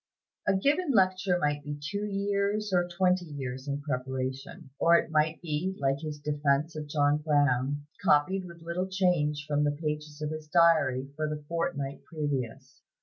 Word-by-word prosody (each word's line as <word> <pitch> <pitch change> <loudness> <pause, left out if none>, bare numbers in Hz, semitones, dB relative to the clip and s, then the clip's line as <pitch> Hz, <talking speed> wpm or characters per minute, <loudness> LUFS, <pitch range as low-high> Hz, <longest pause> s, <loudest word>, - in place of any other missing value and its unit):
A - - +4
given 290 - +2
lecture 185 -2 +3
might 145 -3 0
be 145 0 -5
two 200 +8 -3
years, 200 +1 -1
or 175 -1 +3
twenty 180 0 +1
years 135 -3 -6
in 140 0 -2
preparation; 130 -1 -4
or 170 +1 +6
it 165 - -2
might 155 +1 +2
be, 170 +4 -2
like 135 0 0
his 155 -1 -5
defense 145 +1 0
of 155 -1 -5
John 145 0 +2
Brown, 145 -2 +1 0.2
copied 185 +6 +3
with 170 -1 -12
little 170 +3 -2
change 175 -6 +1
from 145 0 +1
the 145 0 0
pages 150 -1 -4
of 150 0 -3
his 155 -1 -6
diary 150 -6 +3
for 155 0 -1
the 150 -1 -5
fortnight 145 -4 -2
previous. 145 -7 -4
150 Hz, 165 wpm, -29 LUFS, 145-175 Hz, 0.2 s, or